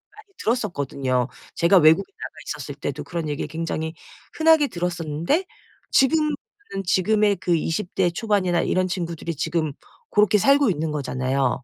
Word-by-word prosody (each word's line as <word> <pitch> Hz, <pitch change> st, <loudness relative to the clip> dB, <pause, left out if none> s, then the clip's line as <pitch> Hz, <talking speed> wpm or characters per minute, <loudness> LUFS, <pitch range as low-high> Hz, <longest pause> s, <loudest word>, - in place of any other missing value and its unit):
많이 425 Hz, -2 st, -17 dB
들었었거든요. 140 Hz, -, -1 dB, 0.3 s
제가 170 Hz, +3 st, +4 dB
외국에 160 Hz, -, +5 dB
나가 -, -, -8 dB, 0.2 s
있었을 -, -, -5 dB
때도 -, -, -5 dB
그런 165 Hz, -3 st, -4 dB
얘기 145 Hz, -, -2 dB
굉장히 160 Hz, 0 st, -3 dB, 0.4 s
흔하게 320 Hz, -2 st, +5 dB
들었었는데 175 Hz, -, -1 dB, 0.5 s
지금은 300 Hz, +2 st, +3 dB, 0.5 s
지금의 205 Hz, +3 st, +2 dB
그 175 Hz, 0 st, +1 dB
20 165 Hz, +4 st, -2 dB
대 185 Hz, -2 st, +2 dB
초반이나 185 Hz, -2 st, +1 dB
이런 185 Hz, 0 st, +1 dB
친구들이 170 Hz, -2 st, -4 dB
지금 155 Hz, 0 st, -1 dB, 0.4 s
고렇게 210 Hz, 0 st, +4 dB
살고 275 Hz, +1 st, +4 dB
있는 160 Hz, -2 st, -2 dB
거잖아요. 135 Hz, -2 st, -1 dB
175 Hz, 340 characters per minute, -23 LUFS, 155-215 Hz, 0.5 s, 외국에